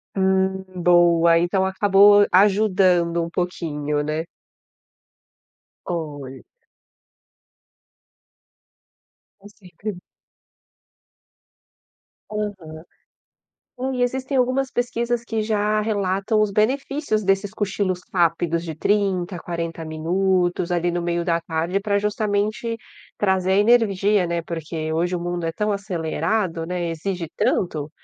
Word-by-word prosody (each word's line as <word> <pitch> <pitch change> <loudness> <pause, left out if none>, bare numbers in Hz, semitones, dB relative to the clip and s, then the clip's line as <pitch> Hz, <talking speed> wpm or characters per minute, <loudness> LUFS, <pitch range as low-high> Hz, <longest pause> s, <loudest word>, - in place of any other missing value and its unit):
Hum. 190 0 +1
Boa, 170 -1 +4
então 190 +2 +1
acabou 205 +1 +5
ajudando 185 -4 +3
um 165 - -5
pouquinho, 150 -4 -2
né. 155 +2 -2 1.6
Olha. 145 -6 -5 3.0
Com 205 - -13
certeza. 195 0 -8 2.3
Aham. 195 -7 -5 1.0
Hum, 265 +1 -1
e 250 - -2
existem 260 +2 -2
algumas 255 +1 +1
pesquisas 240 -1 -1
que 225 -2 -2
já 215 0 0
relatam 210 0 0
os 210 - +1
benefícios 255 +2 0
desses 195 +1 +1
cochilos 195 -3 -2
rápidos, 170 -1 +1
de 160 -2 -6
30 190 0 0
a - - -7
40 165 -1 -5
minutos 175 +2 0
ali 175 0 +1
no 175 - -2
meio 170 0 -1
da 170 -1 +1
tarde, 165 +3 -2
para 200 0 0
justamente 210 +2 -1 0.4
trazer 190 -2 +1
a - - +3
energia, 205 -4 +3
né, 170 0 -1
porque 160 -1 -5
hoje 175 +3 0
o 175 - -3
mundo 175 0 -3
é 165 - -1
tão 210 +3 -1
acelerado, 175 -1 -2
né, 175 0 -3
e - - -2
exige 170 0 -4
tanto 155 -5 0
185 Hz, 110 wpm, -22 LUFS, 170-210 Hz, 3.0 s, acabou